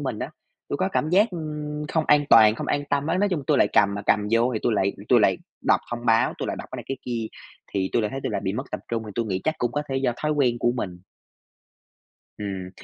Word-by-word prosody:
mình 130 -6 -3
á. 130 +5 -4 0.4
Tôi - - -1
có 185 +5 0
cảm 155 - 0
giác, 205 +6 +4
ưm, 150 -3 -5
không 160 0 0
an 150 0 +5
toàn, 110 -2 +8
không - - -5
an 145 0 0
tâm 145 +1 +1
á, 170 +3 +1
nói 205 +1 +2
chung 165 -7 -1
tôi 145 -2 +3
lại - - +4
cầm 100 0 +4
mà 100 - -4
cầm 105 0 +2
vô 115 +2 +3
thì - - 0
tui - - +2
lại 100 -2 +1 0.2
tui 120 -3 +6
lại 95 -3 +3 0.2
đọc - - +3
thông 120 0 -5
báo, 115 0 +3
tôi - - -3
lại - - -2
đọc - - -8
cái - - -4
này, - - -7
cái 135 - -2
kia, 115 -2 -3 0.5
thì 95 -1 0
tui 120 - +2
lại 105 - -1
thấy 135 - -4
tui - - -2
lại - - -1
bị 95 - 0
mất 130 +6 -3
tập - - -4
trung 115 -1 -2
thì - - -7
tôi 115 -1 -1
nghĩ 95 -3 -2
chắc 155 - +1
cũng 120 - -1
có 145 - -1
thể 135 - -1
do 135 -2 +1
thói 150 0 +1
quen 130 -5 +1
của 120 0 +2
mình. 90 -7 -4 1.4
Ừm. 95 -3 -5
120 Hz, 280 wpm, -24 LUFS, 105-150 Hz, 1.4 s, toàn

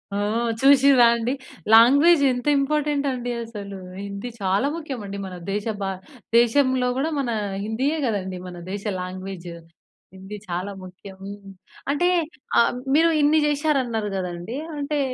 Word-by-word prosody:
ఆ! - - 0 0.4
చూసిన్రాండి? 255 -3 +5 0.4
లాంగ్వేజ్ 285 +8 +7
ఎంత 245 +3 -4
ఇంపార్టెంటండి 280 -4 -1
అసలు. 205 -4 -8 0.3
హిందీ 200 +4 -6
చాలా 195 +7 +1
ముఖ్యమండి. 245 -11 -6
మన 185 -1 -7 0.2
దేశ 205 +1 -2 0.2
భా 195 -1 -1 0.5
దేశంలో 255 +1 +3
కూడా 305 +4 0
మన 260 - -1 0.4
హిందీయే 265 +9 -1
కదండీ! 190 -5 -2
మన 175 -1 -9
దేశ 200 0 -5 0.2
లాంగ్వేజ్. 185 -1 -7 0.7
హిందీ 190 +2 -8
చాలా 180 +3 -3
ముఖ్యం. 190 +1 -12
హ్మ్. 200 -1 -10 0.4
అంటే 325 +5 +1 0.5
ఆహ్, 235 - +3 0.2
మీరు 330 +2 +5
ఇన్ని 300 +2 +4
చేశారన్నరు 270 -8 0
కదండీ! 180 +6 -5 0.2
అంటే, 290 +1 -2
235 Hz, 125 wpm, -23 LUFS, 195-280 Hz, 0.7 s, లాంగ్వేజ్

